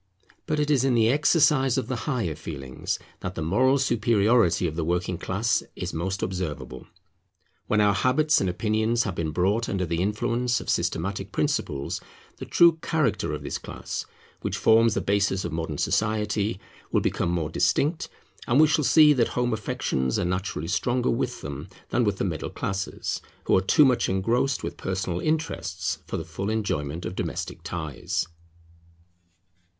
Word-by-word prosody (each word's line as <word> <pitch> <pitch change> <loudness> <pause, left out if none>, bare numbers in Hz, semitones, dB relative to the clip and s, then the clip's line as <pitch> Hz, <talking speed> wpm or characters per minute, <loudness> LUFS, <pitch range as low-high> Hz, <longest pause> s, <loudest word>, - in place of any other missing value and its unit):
But 150 - 0
it 150 0 +1
is 135 -3 +3
in 135 -2 +2
the 115 -1 +4
exercise 145 -2 +3
of 130 - 0
the 130 - -2
higher 115 - 0
feelings 70 -4 -5 0.2
that 90 0 -5
the 80 - -3
moral 130 - +3
superiority 115 - +3
of 80 -2 -2
the 85 - -1
working 90 +1 -1
class 105 +5 0
is - - -4
most 95 +4 -2
observable. 75 -9 -4 0.8
When 105 - +2
our 105 -1 +4
habits 135 +9 +3
and 95 - +1
opinions 110 +5 +1
have 95 - -3
been 85 -2 -2
brought 95 +8 +1
under 95 -2 -1
the 85 0 -1
influence 120 +4 0
of - - -2
systematic 95 +4 -2
principles, 75 - -1 0.4
the - - -8
true 170 -1 +5
character 155 -4 0
of - - -4
this - - -4
class, - - -6 0.3
which - - -2
forms 115 0 +4
the - - 0
basis 100 -2 +1
of 85 - -3
modern 80 -2 -3
society, 105 0 0 0.3
will - - +2
become - - 0
more 85 -3 -1
distinct; 155 +4 +1 0.4
and 125 +4 +3
we 155 - +8
shall 150 0 +2
see 150 +1 +7
that 120 -4 +2
home 125 -1 -1
affections 65 - -1
are - - 0
naturally 90 -3 -2
stronger 120 +8 +1
with - - -2
them 70 0 -6 0.2
than 125 - +2
with 105 -3 0
the - - -1
middle 80 -5 -3
classes, 95 0 -3 0.2
who - - +3
are 95 - +4
too 145 - +5
much 130 -2 +2
engrossed 115 +8 +1
with - - -5
personal 95 -2 -2
interests 95 - -2
for - - -3
the 80 - -5
full 95 +5 -4
enjoyment 85 -7 -2
of 90 - -4
domestic - - -4
ties. 80 -5 -3
100 Hz, 170 wpm, -26 LUFS, 85-125 Hz, 0.8 s, we